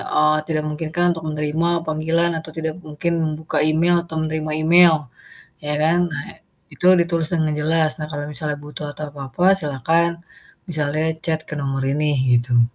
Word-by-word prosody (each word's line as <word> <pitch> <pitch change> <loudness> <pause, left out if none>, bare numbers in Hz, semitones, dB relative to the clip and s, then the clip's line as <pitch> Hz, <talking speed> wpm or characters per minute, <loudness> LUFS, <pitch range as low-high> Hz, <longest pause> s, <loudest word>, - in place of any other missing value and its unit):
eee, 155 0 +4
tidak 155 -2 0
memungkinkan 160 +3 -2
untuk 165 -1 -8
menerima 155 +2 0 0.2
panggilan 160 +2 +1
atau 160 0 -10
tidak 160 -1 -2
mungkin 155 +3 -2
membuka 155 0 -3
email 170 +3 +3
atau 165 - -8
menerima 155 0 -2
email," 170 0 +7 0.7
ya 150 0 -1
kan. 165 +3 +3
Nah 145 0 -4 0.5
itu - - -2
ditulis 170 -2 0
dengan 160 -2 +1
jelas. 160 +1 +2
"Nah, 155 - -4
kalau 145 -1 -4
misalnya 150 0 -3
butuh 150 0 -7
atau 155 - -6
apa-apa 140 +3 -4
silahkan 160 +2 +1 0.6
misalnya 155 -1 -1 0.2
chat 160 -1 0
ke - - -4
nomor 135 -1 -2
ini" 150 +1 +1 0.3
gitu. 120 0 +2
155 Hz, 160 wpm, -21 LUFS, 150-165 Hz, 0.7 s, email